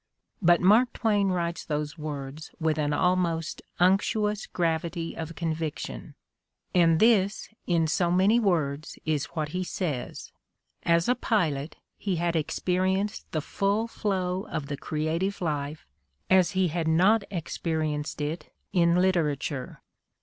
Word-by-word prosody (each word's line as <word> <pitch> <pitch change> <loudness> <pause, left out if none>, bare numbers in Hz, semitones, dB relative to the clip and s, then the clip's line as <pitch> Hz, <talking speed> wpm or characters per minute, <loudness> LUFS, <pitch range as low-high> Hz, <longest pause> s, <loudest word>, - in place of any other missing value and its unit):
But 175 -1 +5
Mark 220 +7 +5
Twain 205 -4 +2
writes 170 -2 -1
those 150 0 -3
words 150 -1 -6
with 160 -2 +1
an 145 -1 +1
almost 170 -1 0 0.2
unctuous 210 +3 +2
gravity 165 0 -2
of 165 0 -6
convic 160 -1 -2
tion, - - -7 0.6
and 165 -2 +4
this, 215 -3 +3 0.2
in 170 -2 +2
so 170 +3 +1
many 190 +6 +4
words, 155 -8 0
is 150 -3 0
what 155 -2 -1
he 180 +4 -2
says: 155 -9 -4 0.5
as 170 0 +2
a 250 - +5
pilot 165 - 0 0.2
he 195 -3 -1
had 170 0 0
experienced 185 +5 -1
the 155 - -1
full 200 +8 0
flow 190 -4 -2
of 150 -3 -4
the 145 - -2
creative 160 +8 -2
life 150 -2 -3 0.5
as 185 -2 +5
he 185 -2 +3
had 165 0 -2
not 190 +7 +4
experienced 155 -4 -2
it 150 +3 -4 0.2
in 170 -1 +4
literature. 155 -7 0
170 Hz, 135 wpm, -27 LUFS, 155-190 Hz, 0.6 s, But